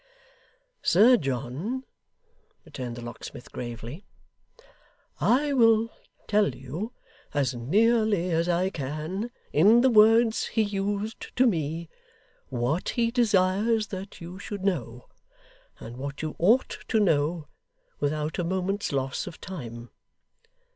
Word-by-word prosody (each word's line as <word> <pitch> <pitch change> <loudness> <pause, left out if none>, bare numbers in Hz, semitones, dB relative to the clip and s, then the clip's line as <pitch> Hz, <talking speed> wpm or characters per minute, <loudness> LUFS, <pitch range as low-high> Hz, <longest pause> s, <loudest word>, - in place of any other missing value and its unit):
'Sir 225 +8 +6
John,' 140 - -3 0.8
returned 125 -3 -6
the 120 - -8
locksmith, 120 +1 -9
gravely, 120 - -7 1.2
'I 280 +4 +2
will 225 -3 +4 0.4
tell 205 - +2
you, 145 - -6 0.4
as 135 -3 +1
nearly 205 - +2
as 165 +1 +1
I 180 +2 +1
can, 155 - -4 0.2
in 210 +10 +6
the 260 0 +4
words 225 +1 +5
he 220 - +1
used 205 +1 -3
to 255 - +5
me, 165 - -1 0.6
what 125 +7 -1
he 230 -2 +1
desires 215 -1 +2
that 195 +1 -7
you 175 +3 -9
should 200 -2 -6
know, 125 - -2 0.7
and 115 +2 -9
what 140 +3 -6
you 155 - -3
ought 225 +10 +3
to 225 - +2
know 160 -4 +1 0.5
without 150 +2 -1
a - - +1
moment's 190 +3 -1
loss 135 +2 -2
of 175 - -9
time. 120 -10 -8
185 Hz, 120 wpm, -27 LUFS, 140-215 Hz, 1.2 s, Sir